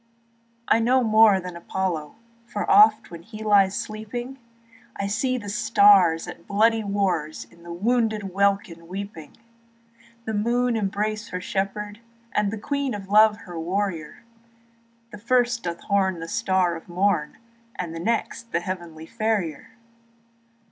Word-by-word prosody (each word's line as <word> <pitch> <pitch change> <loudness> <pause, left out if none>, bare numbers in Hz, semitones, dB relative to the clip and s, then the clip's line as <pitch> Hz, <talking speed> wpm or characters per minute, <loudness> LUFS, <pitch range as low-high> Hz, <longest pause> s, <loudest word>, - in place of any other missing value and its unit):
I - - +4
know 250 +3 +3
more 215 -3 +5
than 180 -1 -7
Apollo, 170 -3 -3 0.3
For 205 -3 -4
oft, 215 +1 +5
when 170 -1 -9
he 215 +4 -10
lies 200 -2 +4
sleeping 240 +5 -6 0.6
I 200 - -3
see 240 +6 0
the 205 -4 -8
stars 200 -5 +4
at 170 - -10
bloody 220 +2 +2
wars 185 -7 -1
In 170 - -20
the 170 0 -10
wounded 215 0 0
welkin 195 -4 0
weeping; 190 -4 -8 0.9
The 220 - -3
moon 240 +3 +1
embrace 210 +1 -2
her 180 - -4
shepherd, 205 +3 -3 0.3
And 210 -1 +1
the 220 - -4
Queen 280 +2 -2
of 195 -1 -9
Love 215 +1 +5
her 175 -6 -8
warrior, 180 +1 -3
While 230 0 -35
the - - -9
first 245 +1 +1
doth 170 -1 -5
horn 190 -3 0
the 165 - -6
star 190 -5 +1
of 165 - -11
morn, 175 -3 0 0.4
And 170 -2 -5
the 165 - -6
next 230 +3 -2
the 170 - +1
heavenly 170 -3 -6
Farrier. 215 -7 -2
205 Hz, 145 wpm, -24 LUFS, 180-225 Hz, 0.9 s, more